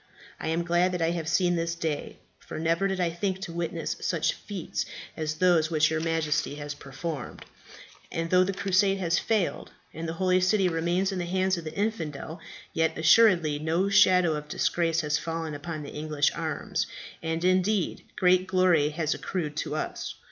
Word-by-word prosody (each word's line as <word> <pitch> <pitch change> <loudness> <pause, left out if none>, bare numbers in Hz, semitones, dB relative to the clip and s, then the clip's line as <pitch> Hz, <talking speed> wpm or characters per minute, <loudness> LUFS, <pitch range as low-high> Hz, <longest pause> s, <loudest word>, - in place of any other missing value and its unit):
"I - - -4
am 165 +2 0
glad 175 +2 +2
that 180 - -2
I 165 - +2
have 165 -2 -3
seen 175 +2 +2
this 170 0 -1
day, 160 -3 -3 0.2
for - - -8
never 165 +4 +1
did 190 -1 -2
I 175 -2 +1
think 185 +2 -2
to 175 -3 -6
witness 170 -1 -3
such 170 -3 +1
feats 200 -5 -4 0.3
as 155 -1 -2
those 165 -2 +3
which 155 -2 +3
your 160 - 0
Majesty 160 -3 0
has 145 0 -5
performed; 140 +1 -6 0.7
and 165 0 -3
though 185 0 +6
the 190 - -1
crusade 195 +1 +2
has 175 -3 +1
failed, 215 -6 -1 0.2
and 160 +1 -5
the - - -2
Holy 185 +1 +2
City 190 +1 +3
remains 175 +3 0
in 190 - -3
the 175 - -2
hands 185 +1 +1
of 170 -2 -7
the 155 - -6
infidel, 165 -7 -3 0.3
yet 160 0 +1
assuredly 165 -3 +5
no 165 +5 +1
shadow 180 -4 +5
of 150 0 -5
disgrace 165 +1 +1
has 150 -1 0
fallen 165 -1 -4
upon 155 +1 -5
the 145 - -8
English 150 -1 0
arms, - - -2 0.3
and, 165 +1 -2
indeed, 185 +1 +1
great 185 0 +3
glory 185 -5 +3
has 155 0 -1
accrued 155 -6 -4
to 150 - -2
us. - - -4
170 Hz, 185 wpm, -27 LUFS, 160-185 Hz, 0.7 s, though